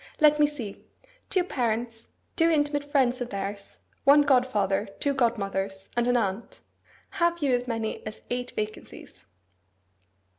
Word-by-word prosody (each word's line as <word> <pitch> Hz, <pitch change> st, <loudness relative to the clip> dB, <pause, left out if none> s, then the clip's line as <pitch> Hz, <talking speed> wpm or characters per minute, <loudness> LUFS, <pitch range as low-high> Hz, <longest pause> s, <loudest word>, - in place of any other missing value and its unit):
Let 300 Hz, -1 st, +5 dB
me 295 Hz, -, +6 dB
see. 250 Hz, -9 st, -7 dB, 0.5 s
Two 370 Hz, -2 st, +2 dB
parents, 230 Hz, -6 st, -2 dB, 0.3 s
two 330 Hz, 0 st, +4 dB
intimate 290 Hz, -2 st, +1 dB
friends 260 Hz, -3 st, +2 dB
of 245 Hz, -, -3 dB
theirs, 200 Hz, 0 st, -6 dB, 0.3 s
one 285 Hz, +2 st, +7 dB
godfather, 215 Hz, -7 st, +2 dB
two 285 Hz, -, +1 dB
godmothers, 195 Hz, -6 st, -1 dB
and 240 Hz, 0 st, +1 dB
an 245 Hz, 0 st, +3 dB
aunt. 200 Hz, 0 st, -3 dB, 0.5 s
Have 340 Hz, 0 st, +1 dB
you 270 Hz, -3 st, +3 dB
as 245 Hz, 0 st, 0 dB
many 225 Hz, -2 st, -3 dB
as 215 Hz, -, -8 dB
eight 245 Hz, 0 st, -2 dB
vacancies? 210 Hz, -, -7 dB
245 Hz, 140 wpm, -27 LUFS, 210-285 Hz, 0.5 s, one